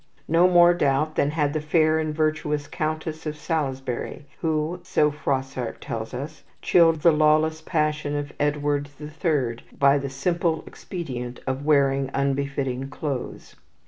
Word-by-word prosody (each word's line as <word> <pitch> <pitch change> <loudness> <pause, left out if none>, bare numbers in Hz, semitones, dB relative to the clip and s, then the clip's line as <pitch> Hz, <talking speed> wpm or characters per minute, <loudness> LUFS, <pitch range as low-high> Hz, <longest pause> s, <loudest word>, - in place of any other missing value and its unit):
No 165 +3 +5
more 175 -1 +6
doubt 155 -2 +1
than 140 - +1
had 150 -2 0
the 155 - -1
fair 155 +1 +3
and 155 -1 -1
virtuous 150 -1 -1
Countess 155 +1 -4
of 150 0 -4
Salisbury, 135 -4 -3
who, 160 +2 -1
so 150 0 +2
Froissart 135 -4 -3
tells 110 -1 -5
us, 145 +5 -6 0.2
chilled 165 -3 +4
the 170 - +6
lawless 155 +1 +3
passion 150 -2 -1
of 145 0 -4
Edward 145 -1 0
the 150 0 -8
Third 145 -8 -1 0.2
by 140 0 +4
the 140 0 -4
simple 160 +3 -1
expedient 125 -9 -6
of 135 +1 -3
wearing 140 -2 +3
unbefitting 140 -1 -1
clothes. 140 -3 -5
150 Hz, 145 wpm, -24 LUFS, 140-155 Hz, 0.2 s, more